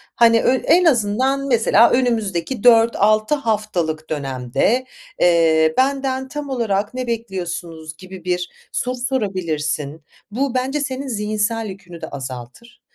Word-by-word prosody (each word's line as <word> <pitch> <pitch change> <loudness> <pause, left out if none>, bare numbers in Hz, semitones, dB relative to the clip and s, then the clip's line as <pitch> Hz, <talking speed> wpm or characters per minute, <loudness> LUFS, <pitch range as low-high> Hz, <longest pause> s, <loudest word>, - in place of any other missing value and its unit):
Hani, 230 -1 +5
ö 255 - +3
en 345 +7 +3
azından 260 +1 +1
mesela, 230 -2 +4
"Önümüzdeki 225 -3 0
4-6 225 0 +4
haftalık 205 - -2
dönemde, 135 - -1 0.4
eee, 160 -2 +4
benden 265 0 0
tam 290 +2 -6
olarak 215 -5 -1
ne 255 0 -4
bekliyorsunuz?" 175 -8 -5
gibi 185 -1 -11
bir 180 0 -1 0.2
soru 250 0 -2
sorabilirsin. 170 - -2 0.3
Bu, 260 +4 -1
bence 265 +3 0
senin 275 -1 -4
zihinsel 215 0 -1
yükünü 180 -3 -11
de - - -5
azaltır. 135 - -9
215 Hz, 120 wpm, -20 LUFS, 170-255 Hz, 0.4 s, Hani